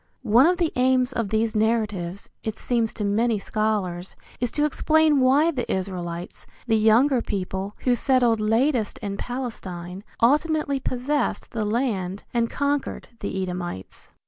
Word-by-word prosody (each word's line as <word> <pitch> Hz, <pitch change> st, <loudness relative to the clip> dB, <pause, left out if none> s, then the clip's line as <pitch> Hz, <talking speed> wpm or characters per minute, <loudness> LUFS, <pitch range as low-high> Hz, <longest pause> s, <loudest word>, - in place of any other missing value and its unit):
One 240 Hz, +5 st, +5 dB
of 360 Hz, +1 st, +2 dB
the 340 Hz, -3 st, 0 dB
aims 255 Hz, 0 st, +2 dB
of 230 Hz, -4 st, -2 dB
these 220 Hz, +1 st, 0 dB
narratives, 210 Hz, -4 st, -1 dB, 0.2 s
it 220 Hz, -1 st, -4 dB
seems 235 Hz, -3 st, 0 dB
to 215 Hz, -, -3 dB
many 220 Hz, +3 st, +2 dB
scholars, 195 Hz, -4 st, -2 dB, 0.2 s
is 245 Hz, -1 st, -1 dB
to 295 Hz, -, +2 dB
explain 310 Hz, 0 st, +3 dB
why 275 Hz, +6 st, +4 dB
the 255 Hz, -6 st, -3 dB
Israelites, 180 Hz, -2 st, -4 dB, 0.2 s
the 225 Hz, -, +2 dB
younger 235 Hz, +5 st, +4 dB
people, 195 Hz, 0 st, -4 dB
who 250 Hz, -1 st, +2 dB
settled 245 Hz, -3 st, +2 dB
latest 225 Hz, +2 st, +1 dB
in 200 Hz, -1 st, -3 dB
Palestine, 195 Hz, -8 st, -6 dB, 0.2 s
ultimately 295 Hz, +2 st, +2 dB
possessed 260 Hz, +2 st, -2 dB
the 220 Hz, -2 st, -2 dB
land 205 Hz, -5 st, -1 dB
and 235 Hz, -1 st, +1 dB
conquered 285 Hz, 0 st, -2 dB
the 190 Hz, -1 st, -3 dB
Edomites. 180 Hz, -, -6 dB
225 Hz, 145 wpm, -24 LUFS, 200-260 Hz, 0.2 s, One